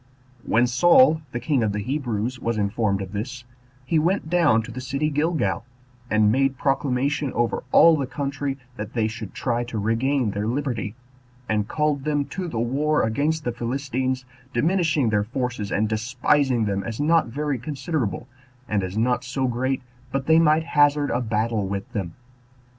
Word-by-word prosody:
When 120 +2 +3
Saul, 160 - +5
the 120 - -3
king 140 -1 +1
of 105 -2 0
the 105 - -2
Hebrews, 125 -3 -2
was 115 -2 -1
informed 100 -1 0
of 95 - -9
this, 120 +5 -5 0.4
he 155 +4 +2
went 170 0 0
down 150 -11 +4
to 115 - -8
the 130 +3 -6
city 140 +4 -1
Gilgal, 145 - 0 0.5
and 110 -1 +4
made 135 +2 +1
proclamation 135 +1 0
over 120 -1 0
all 165 -1 +7
the 140 -4 -2
country, 140 0 -3 0.2
that 105 +2 -6
they 115 -3 +1
should 110 -2 -7
try 120 -2 -1
to 120 -2 -5
regain 115 +3 +1
their 100 +2 -2
liberty; 120 -5 -2 0.5
and 105 -1 0
called 150 -2 0
them 145 -1 0
to 185 -1 -3
the 140 - -5
war 145 +6 +1
against 150 +8 0
the 120 - -1
Philistines, 130 +1 -2 0.3
diminishing 155 -2 +2
their 105 -1 +2
forces, 120 -3 -3
and 110 +2 +1
despising 120 +3 +1
them 100 -1 -1
as 115 -1 -5
not 160 +1 +3
very 140 +2 -2
considerable, 135 - -3 0.4
and 105 -2 0
as 95 +2 -4
not 120 +3 +1
so 130 +1 -2
great 130 +2 -1 0.3
but 135 -1 -2
they 160 +1 +5
might 155 0 +4
hazard 145 -2 +3
a 120 - 0
battle 110 -2 -1
with 100 0 -5
them. 95 -5 -4
125 Hz, 170 wpm, -24 LUFS, 110-145 Hz, 0.5 s, all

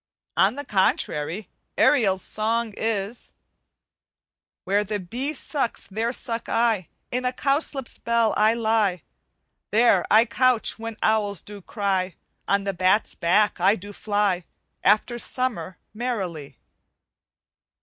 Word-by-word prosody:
On - - +3
the 285 +1 -6
contrary, 190 -2 0 0.3
Ariel's 200 -9 +3
song 225 +1 -1
is 220 0 -3 1.3
"Where 200 +2 +1
the 210 0 -3
bee 240 +11 -3
sucks, 270 -3 -2
there 225 +4 -2
suck 230 -2 -3
I; 225 -6 +1 0.2
In 250 +1 -1
a 250 - +1
cowslip's 275 0 0
bell 235 -2 +2
I 215 +2 +4
lie; 220 -6 +1 0.7
There 215 -4 +4
I 220 +2 +6
couch 250 -3 +2
when 225 -1 -6
owls 210 -3 +1
do 205 -1 -9
cry. 190 -3 -1 0.3
On 200 0 +2
the 195 0 -2
bat's 185 +4 +2
back 200 +4 +2
I 195 +4 +4
do 205 0 -9
fly, 205 -4 0 0.4
After 215 +4 +2
summer, 225 -10 -2 0.2
merrily." 195 - -4
215 Hz, 120 wpm, -24 LUFS, 195-235 Hz, 1.3 s, I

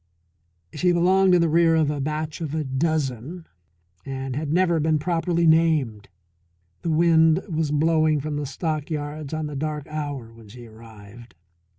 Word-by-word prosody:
She 175 +4 +1
belonged 185 +2 +4
in 175 - +3
the 170 - +3
rear 165 +1 +3
of 155 -2 +2
a 145 -2 -3
batch 155 +3 -4
of 155 -2 -4
a 155 - -1
dozen, 145 +2 -2 0.6
and 135 -1 -5
had 150 0 -3
never 170 -1 +2
been 155 0 +1
properly 170 +2 0
named. 155 -10 +2 0.7
The 170 - -3
wind 160 +1 +4
was 160 -4 -1
blowing 155 0 +2
from 150 +1 -4
the 145 -1 -3
stockyards 150 0 -4
on 155 -1 -3
the 150 -1 -6
dark 150 0 -3
hour 145 -6 -6
when 115 -1 -16
she 120 +3 -12
arrived. 110 0 -14
155 Hz, 160 wpm, -23 LUFS, 135-165 Hz, 0.7 s, belonged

